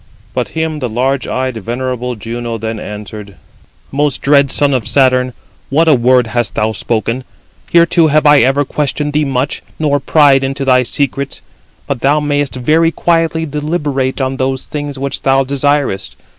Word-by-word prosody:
But - - -1
him 160 -1 -1
the 125 -3 -3
large 130 +4 -1
eyed, 130 -2 -2
venerable 125 +2 -3
Juno 115 +1 -5
then 110 0 -4
answered: 105 -1 -8 0.6
"Most 145 0 0
dread 140 -1 +4
son 140 +1 +2
of 125 -4 -1
Saturn, 130 -2 +3 0.4
what 160 +4 +2
a 155 - +6
word 125 -1 +3
hast 115 -3 -2
thou 110 +1 +1
spoken? 115 +3 -2 0.5
Heretofore 170 -1 +4
have 155 +1 +2
I 145 -1 +7
ever 135 +4 +2
questioned 150 +1 -2
thee 150 0 +1
much, 135 0 -2 0.2
nor 145 -2 +1
pryed 140 -1 +4
[into 135 +1 -2
thy 130 -1 +4
secrets]; 140 +2 -2 0.4
but 135 -4 -3
thou 145 +3 +3
mayest 145 -2 -1
very 155 +6 +2
quietly 165 -1 0
deliberate 145 -3 -2
on 130 0 -1
those 130 0 -1
things 145 -2 -5
which 135 +1 -3
thou 135 0 +3
desirest. 140 -6 -1
135 Hz, 160 wpm, -14 LUFS, 125-145 Hz, 0.6 s, I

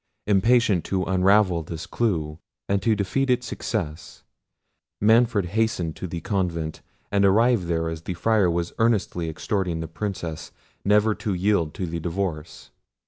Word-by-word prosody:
Impatient 105 -2 +3
to 95 -1 -1
unravel 95 -1 +3
this 80 +1 -7
clue, 80 -9 -1 0.3
and 100 0 +1
to 115 -2 +2
defeat 115 +7 -1
its 125 0 +2
success, 90 -9 -5 0.8
Manfred 110 -2 +4
hastened 105 -6 0
to 95 - -5
the 85 0 -5
convent, 85 -5 -2 0.3
and 100 0 +2
arrived 105 0 +3
there 80 -1 0
as 80 -1 -5
the 90 +2 -5
Friar 105 0 +2
was 85 0 -2
earnestly 100 -7 +1
exhorting 90 +1 -2
the 80 - -4
Princess 85 -2 -5 0.3
never 105 +2 +3
to 105 -2 -3
yield 90 -4 +1
to 95 - -3
the 85 0 -4
divorce. 85 -2 -4
95 Hz, 145 wpm, -24 LUFS, 85-105 Hz, 0.8 s, Manfred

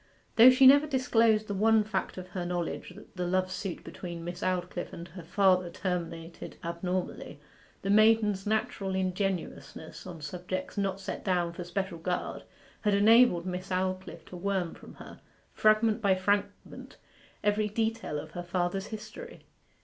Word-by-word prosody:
Though 235 +3 +10
she 255 +1 +5
never 285 +3 +8
disclosed 230 -5 +3
the 205 - -3
one 220 +2 +4
fact 215 -2 -3
of 185 0 -7
her 180 -1 -4
knowledge 175 0 -3
that 205 - -15
the 180 -1 -2
love 185 +1 0
suit 190 -2 -5
between 170 -2 -7
Miss 175 +1 -6
Aldclyffe 180 -1 -2
and 170 +1 -8
her 180 +2 -9
father 185 +1 +2
terminated 170 -2 -5
abnormally, 180 +2 -4 0.4
the 195 - 0
maiden's 215 -2 +4
natural 200 -3 -1
ingenuousness 185 -3 -3
on 175 -3 -8
subjects 180 +4 -5
not 195 -2 -1
set 195 - -6
down 175 -3 0
for 175 - -6
special 175 0 -3
guard 180 +2 -3 0.4
had 210 -2 +2
enabled 215 -3 +5
Miss 185 +1 -5
Aldclyffe 185 0 -3
to - - -11
worm 185 -2 -1
from - - -13
her, - - -12 0.3
fragment 215 +1 +3
by 195 -3 +3
fragment, 200 +1 -2 0.5
every 210 +1 +1
detail 220 -7 -2
of 155 +1 -7
her 175 - -5
father's 175 +2 -2
history. 220 - -9
190 Hz, 155 wpm, -29 LUFS, 180-210 Hz, 0.5 s, Though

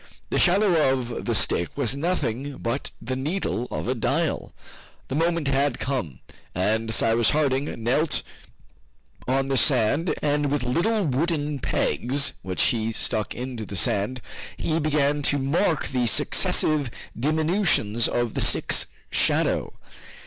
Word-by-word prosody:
The - - +1
shadow 175 -6 +4
of 125 -3 -3
the - - 0
stick 85 - +1
was 120 +3 -1
nothing 140 -4 -2
but 115 +4 -3
the 125 +3 -4
needle 135 -3 -2
of - - -4
a 125 - +1
dial. 120 - -1 0.6
The - - -3
moment 165 0 0
had 140 -1 +1
come, 120 - -3 0.3
and 110 +5 0
Cyrus 115 0 +3
Harding 140 -2 +1 0.2
knelt 145 +7 +1 1.0
on 135 +1 +1
the 135 -1 0
sand, 145 +9 +2
and 145 0 +1
with 145 -2 -1
little 185 - +1
wooden 150 0 -1
pegs, 135 +3 0
which 95 -1 -1
he 115 -1 +1
stuck 110 -1 -1
into 125 -2 -5
the 100 - -7
sand, 105 +7 +1 0.4
he 160 0 -1
began 145 -1 +1
to 145 0 +2
mark 150 +4 0
the 125 -2 0
successive 145 +4 +3 0.3
diminutions 155 - +1
of 120 -2 -1
the - - -1
stick's - - +2 0.2
shadow. - - +1
135 Hz, 135 wpm, -24 LUFS, 120-150 Hz, 1.0 s, shadow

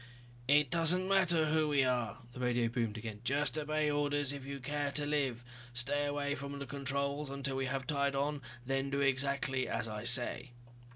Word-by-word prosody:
"It 145 -1 +4
doesn't 170 +3 +3
matter 175 -5 +3
who 155 0 +2
we 145 -2 +3
are," 125 -1 -1
the 125 - -9
radio 120 -2 +1
boomed 115 -2 -2
again. 110 -1 -7
"Just 140 +2 +1
obey 155 0 0
orders 145 -1 0
if 140 -2 -7
you 140 +1 -6
care 145 +2 -2
to 150 - +3
live. 135 -5 -1 0.3
Stay 145 +4 +1
away 145 0 -1
from 140 0 -6
the 140 - -5
controls 140 +2 -2
until 140 0 -3
we 135 0 -1
have 135 0 -2
tied 140 0 0
on, 145 +1 -1 0.2
then 135 +1 -1
do 140 0 -1
exactly 135 -1 +1
as 115 -1 -2
I 105 -1 -5
say." 120 +1 +3
140 Hz, 185 wpm, -33 LUFS, 130-145 Hz, 0.3 s, It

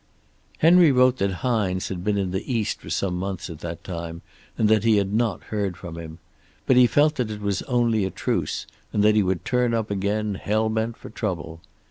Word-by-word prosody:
"Henry 170 -1 +6
wrote 130 0 +4
that 100 -2 0
Hines 100 -7 0
had 90 -2 -5
been 105 0 +1
in 95 -2 -1
the 95 +7 -3
East 115 -4 -1
for - - -10
some 95 -2 -1
months 95 -1 -4
at 80 - -9
that 85 -1 -6
time, 85 -2 -6 0.3
and 110 - +3
that 110 -1 +3
he 110 -2 +4
had 100 0 0
not 110 -3 0
heard 100 -4 -3
from 85 -1 -8
him. 80 -1 -8 0.5
But 130 - +4
he 125 -1 +7
felt 150 +5 +3
that 125 -4 -1
it 105 -1 -5
was 100 -2 -1
only 120 -4 +2
a 95 - 0
truce, - - -2 0.3
and 105 - +1
that 105 0 +5
he 105 - +4
would 95 -2 -1
turn 125 -2 +1
up 110 -2 -2
again, 100 +2 -1
hell 110 +2 +1
bent 110 +1 -2
for - - -11
trouble. 85 -7 -4
105 Hz, 215 wpm, -24 LUFS, 95-115 Hz, 0.5 s, he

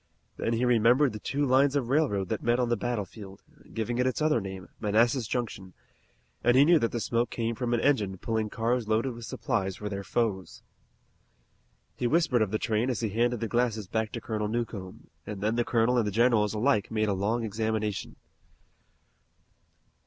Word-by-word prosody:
Then 115 - -1
he 115 +2 +1
remembered 125 +3 +4
the 105 - -6
two 145 +6 -1
lines 135 +2 +3
of 130 -4 0
railroad 115 - +1
that - - -2
met 120 +1 +1
on 125 -1 +1
the 120 - +2
battlefield, 105 -4 -5 0.3
giving 120 +2 -2
it 125 - +2
its 130 - -1
other 155 -6 +2
name, 95 -2 -7
Manassas 115 +3 +2
Junction, 105 -7 -4 0.7
and 120 +1 +4
he 140 - +7
knew 170 0 +5
that 115 - 0
the 120 - -2
smoke 115 +1 0
came 115 -1 -2
from 120 +1 -3
an 120 -1 +1
engine 105 -10 +1
pulling 110 +2 -2
cars 115 +1 -1
loaded 115 +4 +1
with 115 0 -9
supplies 100 -8 -2
for 105 +2 -5
their 100 -1 -4
foes. 100 -4 -2 1.3
He 120 - -1
whispered 145 -4 +2
of 110 - +2
the 110 - 0
train 110 +2 0
as 125 - -2
he 110 - 0
handed 120 +2 0
the 115 - -1
glasses 115 -3 0
back 110 +1 -2
to 115 - -4
Colonel 105 -2 -2
Newcomb, 105 -5 -5 0.2
and 105 -2 -5
then 105 +3 0
the 120 - +2
colonel 120 +1 +2
and 110 - 0
the - - -1
generals 110 -1 +2
alike 110 -2 +1
made 110 -1 0
a 100 - +1
long 105 +5 -1
examination. 110 -1 -2
115 Hz, 190 wpm, -28 LUFS, 105-120 Hz, 1.3 s, he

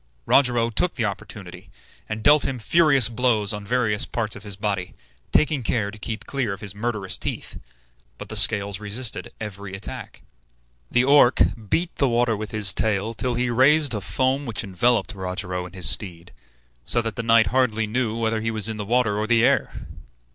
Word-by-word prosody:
Rogero 120 -4 +3
took 170 +11 -1
the 120 -4 -1
opportunity, 100 -2 -7 0.4
and 110 0 -5
dealt 145 +2 +6
him 130 - -2
furious 140 0 +4
blows 115 -3 0
on 105 0 -6
various 105 -1 0
parts 110 -3 -3
of 105 - -10
his 105 -2 -5
body, 100 -3 -3 0.4
taking 150 -2 +2
care 110 -3 -1
to 110 - -13
keep 110 +1 -5
clear 130 -7 -2
of 100 - -10
his 100 -3 -6
murderous 105 -3 -3
teeth; - - -5 0.6
but - - -9
the 110 - -7
scales 100 -2 +4
resisted 105 +3 -3
every 100 -2 -7
attack. 100 - -9 0.7
The 120 - +2
Orc 135 -2 +5 0.3
beat 170 - -1
the 140 - +2
water 120 -1 +1
with 105 0 -6
his 105 -3 +2
tail 110 +1 -1
till 125 +2 -2
he 120 0 -1
raised 140 +3 +4
a 105 - -3
foam 130 +7 -1
which 115 -1 -4
enveloped 115 +5 0
Rogero 90 -1 -4
and 95 - -15
his 90 -4 0
steed, 85 -1 -2 0.5
so 120 - 0
that 115 -3 -4
the - - -3
knight 115 -1 +4
hardly 115 -4 +1
knew 115 0 -2
whether 110 -1 -1
he 115 - -2
was 110 -1 -1
in 110 -1 -3
the 105 - -5
water 115 -4 +1
or 110 - -2
the 115 -1 +3
air. - - +2
110 Hz, 190 wpm, -23 LUFS, 100-125 Hz, 0.7 s, dealt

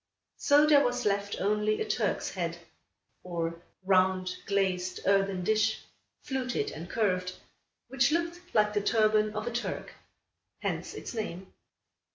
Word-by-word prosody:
So 290 +1 +5
there 295 -2 +6
was 245 0 -1
left 200 0 0
only 210 +1 +1
a 435 - -2
Turk's - - -1
Head, - - -3 0.6
or 170 -1 -4 0.2
round 185 -1 +2
glazed 185 -2 0
earthen 195 -2 +2
dish, 215 +3 +1 0.4
fluted 255 - -2
and 165 +3 -8
curved, 185 -4 0 0.5
which 245 0 +2
looked 340 +2 -1
like 210 -1 +4
the 205 - +1
turban 215 0 +2
of 215 +1 -3
a 240 - -2
Turk. 240 +1 -4 0.7
Hence - - -3
its - - -7
name. 190 -5 -5
210 Hz, 135 wpm, -29 LUFS, 185-240 Hz, 0.7 s, there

